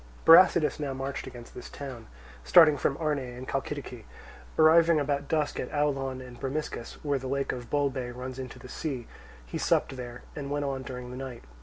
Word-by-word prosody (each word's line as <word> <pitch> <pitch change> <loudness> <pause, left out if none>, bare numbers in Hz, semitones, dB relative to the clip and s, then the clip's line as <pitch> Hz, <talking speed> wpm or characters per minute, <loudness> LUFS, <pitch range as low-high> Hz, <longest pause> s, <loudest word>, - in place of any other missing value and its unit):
Brasidas 165 -2 +7
now 140 -3 -3
marched 135 +1 -4
against 120 -2 -10
this 125 - -9
town, 130 -6 -8 0.4
starting 155 - +7
from 140 +1 0
Arne 155 -3 0
in 125 -1 -7
Chalcidice. 135 -3 -4 0.5
Arriving 160 0 +6
about 145 0 -1
dusk 155 -2 0
at - - -4
Aulon 135 -3 -1
and 125 -1 -12
Bromiscus, 135 -3 -4
where 140 -2 +1
the 130 - -6
lake 140 +1 -1
of 120 -1 -7
Bolbe 140 -4 0
runs 130 +1 -6
into 130 -2 -7
the 130 - -11
sea, 130 -3 -4 0.4
he - - -5
supped - - +1
there, 120 -1 -7
and 140 -2 -5
went 145 0 -1
on 135 -1 -2
during 125 -1 -7
the 125 - -7
night. 130 - -7
135 Hz, 185 wpm, -28 LUFS, 125-145 Hz, 0.5 s, Brasidas